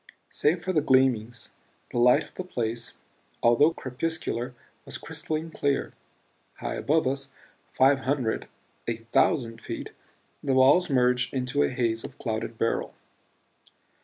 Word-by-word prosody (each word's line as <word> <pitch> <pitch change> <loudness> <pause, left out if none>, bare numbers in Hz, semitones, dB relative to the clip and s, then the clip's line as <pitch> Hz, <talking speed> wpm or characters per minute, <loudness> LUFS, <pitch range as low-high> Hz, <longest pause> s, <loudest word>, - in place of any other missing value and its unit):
Save 165 +4 +1
for 185 - 0
these 155 - +3
gleamings 125 -4 +2 0.4
the 120 - -1
light 125 +1 +5
of - - -16
the 185 - -5
place, 115 -8 -3 0.5
although 120 +7 +5
crepuscular, 130 -3 -3 0.3
was - - -4
crystalline 160 0 -4
clear. 140 -3 -1 0.6
High - - -4
above 155 +3 +1
us 135 +1 -2 0.4
five 135 +1 +4
hundred, 130 -4 -1 0.4
a 115 - 0
thousand 115 +1 +1
feet - - -6 0.5
the 135 -2 +1
walls 140 +8 +5
merged 125 -1 +2
into 130 +2 0
a - - +3
haze 115 -3 -1
of - - -9
clouded 110 -1 -3
beryl. 115 - -1
130 Hz, 130 wpm, -27 LUFS, 120-145 Hz, 0.6 s, light